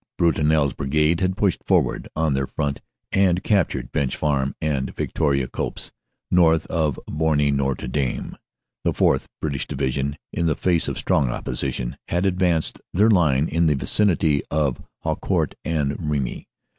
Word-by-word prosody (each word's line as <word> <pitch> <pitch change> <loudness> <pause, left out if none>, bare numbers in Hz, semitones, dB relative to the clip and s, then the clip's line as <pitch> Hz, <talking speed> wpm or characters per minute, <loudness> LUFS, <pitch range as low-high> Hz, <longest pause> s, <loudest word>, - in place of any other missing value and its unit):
Brutinel 80 -3 +3
s 70 - -2
Brigade 75 +4 +1
had 95 0 0
pushed 100 -4 +1
forward - - +1
on 80 -2 +1
their 70 0 0
front 70 -1 -3 0.3
and 95 -1 +2
captured 100 -7 +1
Bench 65 -2 0
Farm 70 -3 0
and 70 -4 -2
Victoria 70 -4 0
Copse, - - -4 0.4
north 80 -3 +4
of 75 -5 0
Boiry 75 -2 +1
Notre 70 -2 -1
Dame. 65 0 -2 0.5
The - - +1
4th. - - +2
(Brit 75 -2 -2
ish) 70 - -3
Division 70 +2 -2 0.2
in 85 - 0
the 80 - +2
face 85 -3 +1
of - - -3
strong 70 -5 +1
opposition, 60 0 -3
had 85 +3 0
advanced 90 -4 +1
their 105 +5 +4
line 80 -7 +3
in 85 +1 +2
the 75 - +3
vicinity 80 -2 +2
of 75 -4 0 0.2
Haucourt - - 0
and 75 0 -1
Remy. 70 -4 -2
75 Hz, 155 wpm, -23 LUFS, 70-85 Hz, 0.5 s, north